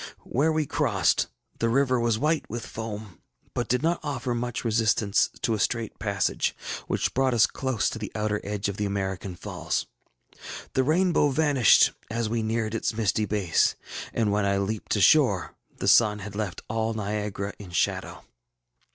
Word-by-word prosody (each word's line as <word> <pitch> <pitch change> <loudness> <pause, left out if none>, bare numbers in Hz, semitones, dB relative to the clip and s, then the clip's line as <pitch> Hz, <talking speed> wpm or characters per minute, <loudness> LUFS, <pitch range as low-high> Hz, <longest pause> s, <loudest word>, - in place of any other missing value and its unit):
Where 150 +6 +1
we 155 -1 +1
crossed - - +1 0.3
the 115 - +1
river 130 0 +2
was 115 -2 +1
white 155 +5 0
with 115 +1 -5
foam, 105 -4 -7 0.3
yet 120 - -1
did 125 +3 0
not 170 +1 +1
offer 130 -5 -2
much 120 0 -3
resistance 110 -2 +2
to 115 - +2
a 110 - -1
straight 115 +2 -1
passage, 100 -2 0 0.3
which - - 0
brought 130 -1 +2
us 110 - +6
close 130 -5 -1
to 110 - -6
the 105 - -5
outer 105 -1 -1
edge 105 0 -2
of 100 -1 -4
the 105 - -1
American 95 -1 -3
falls. - - -3 0.9
The 130 - +3
rainbow 165 +1 +3
vanished 140 -5 +5 0.2
as 115 0 -1
we 115 0 0
neared 110 0 -1
its 110 -1 -1
misty 110 -1 +1
base, 100 -5 +2 0.4
and 110 -3 +1
when 105 0 +1
I 100 0 +2
leaped 100 +3 -2
ashore, 105 - +4 0.2
the - - -3
sun 105 -3 +5
had 105 0 -8
left 105 -4 -4
all 110 0 -1
Niagara 105 -1 -3
in 100 -3 -9
shadow. 90 - -1
110 Hz, 170 wpm, -26 LUFS, 105-125 Hz, 0.9 s, us